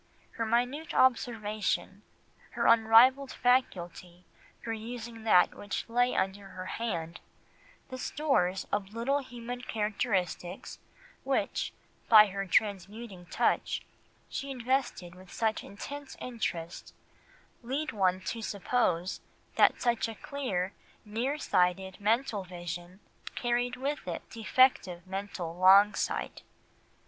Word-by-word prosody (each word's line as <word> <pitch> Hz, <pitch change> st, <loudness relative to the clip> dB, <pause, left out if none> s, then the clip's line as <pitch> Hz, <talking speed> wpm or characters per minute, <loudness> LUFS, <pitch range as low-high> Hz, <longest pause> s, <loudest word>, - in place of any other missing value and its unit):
Her 230 Hz, -, -3 dB
minute 250 Hz, +7 st, 0 dB
observation, 215 Hz, -5 st, +1 dB, 0.5 s
her -, -, -1 dB
unrivalled 230 Hz, +4 st, +6 dB
faculty 180 Hz, -8 st, 0 dB, 0.4 s
for 225 Hz, -, -3 dB
using 225 Hz, 0 st, -7 dB
that 180 Hz, -5 st, +5 dB
which 205 Hz, -, -5 dB
lay 245 Hz, +2 st, +2 dB
under 195 Hz, +1 st, -1 dB
her 185 Hz, -1 st, -8 dB
hand, 175 Hz, -7 st, -4 dB, 0.7 s
the 255 Hz, -1 st, -7 dB
stores 250 Hz, -13 st, 0 dB
of 205 Hz, +1 st, -2 dB
little 270 Hz, +5 st, +1 dB
human 245 Hz, -2 st, -7 dB
characteristics 200 Hz, -5 st, -2 dB, 0.4 s
which, -, -, -1 dB, 0.4 s
by 215 Hz, -2 st, +10 dB
her 195 Hz, 0 st, -4 dB
transmuting 200 Hz, -1 st, -1 dB
touch, -, -, 0 dB, 0.4 s
she 275 Hz, -, -5 dB
invested 250 Hz, -8 st, -1 dB
with 185 Hz, 0 st, -15 dB
such 220 Hz, -1 st, -1 dB
intense 280 Hz, +7 st, -8 dB
interest, 175 Hz, -9 st, -5 dB, 0.7 s
lead 275 Hz, +6 st, -2 dB
one 185 Hz, -3 st, +1 dB
to 225 Hz, +4 st, -4 dB
suppose 195 Hz, -4 st, 0 dB, 0.3 s
that -, -, +5 dB
such 235 Hz, -2 st, +1 dB
a 225 Hz, -, -7 dB
clear, 205 Hz, -10 st, -3 dB, 0.3 s
near 235 Hz, +7 st, -2 dB
sighted 190 Hz, -, +1 dB
mental 220 Hz, -1 st, +1 dB
vision 175 Hz, +1 st, -7 dB, 0.3 s
carried 240 Hz, 0 st, 0 dB
with 275 Hz, -4 st, -3 dB
it 170 Hz, -, -5 dB
defective 220 Hz, -6 st, +2 dB
mental 190 Hz, -3 st, -5 dB
long 195 Hz, +3 st, +7 dB
sight. -, -, -3 dB
215 Hz, 110 wpm, -30 LUFS, 185-245 Hz, 0.7 s, by